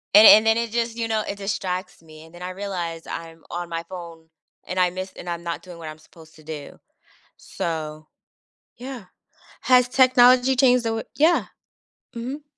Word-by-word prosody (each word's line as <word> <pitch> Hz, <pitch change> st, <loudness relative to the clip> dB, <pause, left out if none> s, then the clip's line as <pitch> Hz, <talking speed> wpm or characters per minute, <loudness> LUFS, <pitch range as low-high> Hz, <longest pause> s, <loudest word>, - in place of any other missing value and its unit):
And 215 Hz, +1 st, +10 dB
and 215 Hz, +1 st, +9 dB
then 225 Hz, +1 st, +4 dB
it 230 Hz, -1 st, -2 dB
just, 230 Hz, -1 st, -1 dB
you 230 Hz, -1 st, -1 dB
know, 220 Hz, -1 st, +1 dB
it 200 Hz, -, -4 dB
distracts 185 Hz, -3 st, -4 dB
me, 155 Hz, 0 st, -14 dB
and 160 Hz, -, -18 dB
then 175 Hz, -, -12 dB
I 185 Hz, -, -4 dB
realized 180 Hz, -4 st, -5 dB
I'm 165 Hz, -1 st, -8 dB
on 175 Hz, 0 st, -4 dB
my 165 Hz, 0 st, -4 dB
phone, 170 Hz, -3 st, -10 dB, 0.4 s
and 185 Hz, +1 st, -2 dB
I 180 Hz, -1 st, +4 dB
miss 185 Hz, +1 st, -6 dB
and 175 Hz, -, -7 dB
I'm 170 Hz, 0 st, -4 dB
not 170 Hz, -1 st, -4 dB
doing 180 Hz, -2 st, -11 dB
what 160 Hz, -1 st, -7 dB
I'm 155 Hz, -, -9 dB
supposed 160 Hz, 0 st, -18 dB
to 155 Hz, -, -17 dB
do, 150 Hz, -2 st, -8 dB, 0.6 s
so 155 Hz, -2 st, -5 dB, 0.7 s
yeah. 250 Hz, -5 st, -8 dB, 0.6 s
Has 250 Hz, -1 st, +4 dB
technology 255 Hz, 0 st, +5 dB
changed 250 Hz, -2 st, +4 dB
the 225 Hz, -, 0 dB
way 225 Hz, -, -3 dB
Yeah. 320 Hz, +4 st, +3 dB, 0.7 s
Mhm. 260 Hz, +6 st, -5 dB
185 Hz, 185 wpm, -23 LUFS, 165-235 Hz, 0.7 s, And